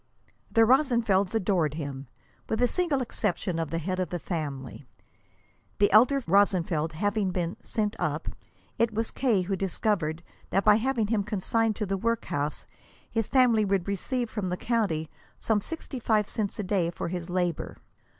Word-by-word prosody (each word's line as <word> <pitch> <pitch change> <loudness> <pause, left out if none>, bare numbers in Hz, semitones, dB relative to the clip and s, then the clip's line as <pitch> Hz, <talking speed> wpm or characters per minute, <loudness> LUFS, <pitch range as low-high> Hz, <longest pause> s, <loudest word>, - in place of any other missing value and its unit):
The 225 +1 +5
Rosenfelds 235 -7 +3
adored 180 -8 +1
him, 140 -3 -5 0.4
with 220 - 0
the 245 +2 +3
single 305 -4 0
exception 185 -6 -2
of 165 -2 -2
the 165 - -2
head 185 +3 -2
of 180 -3 -1
the 175 - -2
family. 145 -6 -5 0.9
The 205 - +3
elder 255 +6 +5
Rosenfeld 170 -4 +2
having 205 +3 0
been 175 -1 -2
"sent 210 -1 -2
up," - - -2 0.5
it 230 0 +3
was 225 +1 -1
K. 225 -8 +1
who 195 +2 -1
discovered 175 -3 -1 0.3
that 195 - +1
by 210 0 +7
having 235 -1 0
him 210 -1 0
consigned 215 +2 0
to 210 - -2
the 195 0 -1
workhouse 185 -9 -2 0.5
his 225 -2 0
family 245 -5 +4
would 195 -2 0
receive 240 +5 -2
from 200 -4 -2
the 180 - -2
county 200 -10 0 0.3
some 215 -2 +1
sixty 310 -1 -6
five 215 -3 +2
cents 210 -3 -3
a 210 - -2
day 185 -3 +1
for 170 - -4
his 175 0 -5
labor. 175 -2 -2
200 Hz, 165 wpm, -27 LUFS, 175-225 Hz, 0.9 s, by